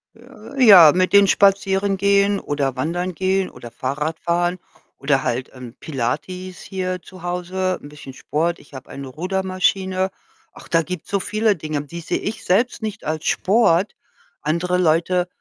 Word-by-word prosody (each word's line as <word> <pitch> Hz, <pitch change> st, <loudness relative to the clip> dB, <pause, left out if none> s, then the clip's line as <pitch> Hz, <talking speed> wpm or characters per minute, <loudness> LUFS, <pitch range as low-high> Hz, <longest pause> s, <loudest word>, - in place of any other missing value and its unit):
J 245 Hz, +2 st, -12 dB
Ja, 175 Hz, -8 st, +10 dB
mit 185 Hz, 0 st, +2 dB
den 200 Hz, -1 st, +7 dB
spazieren 195 Hz, 0 st, +2 dB
gehen 200 Hz, +1 st, +3 dB
oder 140 Hz, -3 st, -2 dB
wandern 175 Hz, +6 st, -2 dB
gehen 190 Hz, +1 st, 0 dB
oder 120 Hz, -, -11 dB
Fahrrad 150 Hz, +7 st, -3 dB
fahren 175 Hz, +1 st, 0 dB, 0.4 s
oder 135 Hz, -1 st, +1 dB
halt, 125 Hz, +2 st, -2 dB
ähm, 125 Hz, -1 st, -10 dB
Pilates 180 Hz, +8 st, -4 dB
hier 185 Hz, -1 st, -4 dB
zu 185 Hz, -2 st, -14 dB
Hause, 180 Hz, +1 st, -2 dB
'n 145 Hz, -, -11 dB
bisschen 145 Hz, -3 st, -11 dB
Sport. 165 Hz, +5 st, -2 dB
Ich -, -, -20 dB
habe 130 Hz, -, -10 dB
eine 140 Hz, -1 st, -8 dB
Rudermaschine. 185 Hz, +3 st, -1 dB, 0.4 s
Ach, -, -, -14 dB
da 165 Hz, -1 st, +3 dB
gibt's 180 Hz, -1 st, -7 dB
so 200 Hz, -1 st, 0 dB
viele 215 Hz, +1 st, +1 dB
Dinge, 155 Hz, -2 st, -3 dB
die 170 Hz, +4 st, -8 dB
sehe 165 Hz, -, -2 dB
ich 215 Hz, +1 st, -5 dB
selbst 230 Hz, +6 st, +1 dB
nicht 215 Hz, -2 st, -5 dB
als 155 Hz, 0 st, -3 dB
Sport. 195 Hz, -2 st, +2 dB, 0.5 s
Andere 170 Hz, +4 st, 0 dB
Leute 175 Hz, +1 st, +2 dB
180 Hz, 160 wpm, -21 LUFS, 155-195 Hz, 0.5 s, Ja